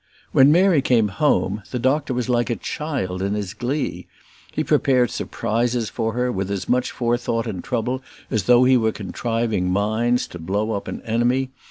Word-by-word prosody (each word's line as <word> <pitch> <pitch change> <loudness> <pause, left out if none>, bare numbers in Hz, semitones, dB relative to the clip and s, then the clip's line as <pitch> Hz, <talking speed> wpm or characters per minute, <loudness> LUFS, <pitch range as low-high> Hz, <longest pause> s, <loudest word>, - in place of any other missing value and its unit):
When 135 +2 +6
Mary 175 -2 +4
came 115 -5 +2
home 105 -2 +1
the 125 - -3
doctor 135 +3 +1
was 125 -1 -1
like 120 -1 +1
a 120 - 0
child 105 -7 -3
in 100 +2 -1
his 100 -3 -4
glee. 135 +4 -3 0.4
He - - -1
prepared 125 -4 +2
surprises 115 0 -1
for 115 0 -2
her 125 +1 0
with 95 -3 -3
as 100 -2 -3
much 125 0 +1
forethought 120 -1 -1
and 100 -6 -5
trouble 125 +1 -2 0.3
as 105 -4 0
though 125 0 +6
he 130 0 +5
were 110 -2 +1
contriving 110 -1 -2
mines 110 +6 +1
to 90 - -9
blow 100 +6 -1
up 100 -2 -3
an - - -6
enemy. 125 +3 +1
120 Hz, 180 wpm, -22 LUFS, 105-125 Hz, 0.4 s, When